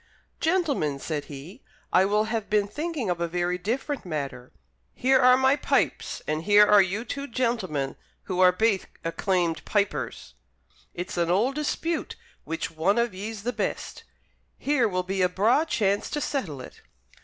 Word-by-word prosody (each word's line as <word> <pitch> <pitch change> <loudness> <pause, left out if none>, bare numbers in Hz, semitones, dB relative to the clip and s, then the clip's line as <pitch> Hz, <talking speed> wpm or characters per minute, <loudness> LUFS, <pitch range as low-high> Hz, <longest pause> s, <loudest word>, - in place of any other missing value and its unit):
"Gentlemen," 305 - +1
said 145 +1 -4
he, 155 - -10 0.3
"I 185 - +6
will 210 +2 +2
have 220 -1 -3
been 205 -1 +2
thinking 295 - -3
of 170 -1 -3
a 170 - +1
very 175 +1 -1
different 260 +9 -2
matter. 140 -7 -5 0.4
Here 260 +1 +3
are 255 0 +6
my 265 +1 +4
pipes, - - 0
and 155 +1 -1
here 205 +3 +6
are 210 -1 +7
you 195 +5 -1
two 280 +2 -5
gentlemen 220 - -1 0.3
who 185 -2 -3
are 185 -1 +7
baith 205 +1 +1 0.2
acclaimed 170 0 0
pipers. 205 -2 -2 0.6
It's 175 +1 -5
an 170 -1 +1
auld 215 +10 +2
dispute 310 +3 -2 0.3
which 165 - -3
one 165 +6 +1
of 235 -3 +1
ye's 205 +2 -6
the 245 +2 -1
best. - - -4 0.5
Here 270 -4 +2
will 185 -2 -1
be 190 +1 -2
a 180 - +4
braw 220 - +3
chance 205 -9 0
to 295 - -2
settle 190 - -3
it." - - -12
200 Hz, 165 wpm, -26 LUFS, 175-250 Hz, 0.6 s, are